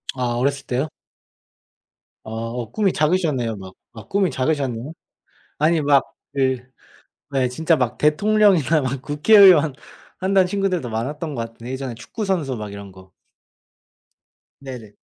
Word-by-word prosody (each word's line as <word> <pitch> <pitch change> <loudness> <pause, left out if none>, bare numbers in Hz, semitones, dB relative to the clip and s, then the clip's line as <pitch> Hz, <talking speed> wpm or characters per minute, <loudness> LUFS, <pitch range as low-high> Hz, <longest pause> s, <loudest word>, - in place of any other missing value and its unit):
아 130 - -3 0.2
어렸을 140 +1 0
때요? 130 +5 -1 1.4
아 - - -8
어 115 +1 -5
꿈이 200 -4 +1
작으셨네요. 150 -8 +1
막 95 -1 -10 0.2
아 110 - -11
꿈이 195 -3 +1
작으셨네요. 135 0 -2 0.7
아니 160 +1 +3
막 140 -2 +4 0.3
네 130 -2 0 0.7
네. 130 -2 +1
진짜 160 +6 +1
막 125 -3 -1
대통령이나 165 -2 +3
막 130 0 -3
국회의원 175 +1 +6 0.5
한다는 190 0 +3
친구들도 185 -8 -1
많았던 145 +7 -4
것 120 - -4
같은데 115 +2 -9
예전에 130 -2 -4
축구 215 - -6
선수 165 -9 -1
막 105 -1 -6
이런 100 -1 -9
거. 95 0 -16 1.5
네네. 125 -6 -9
140 Hz, 275 characters per minute, -21 LUFS, 120-165 Hz, 1.5 s, 국회의원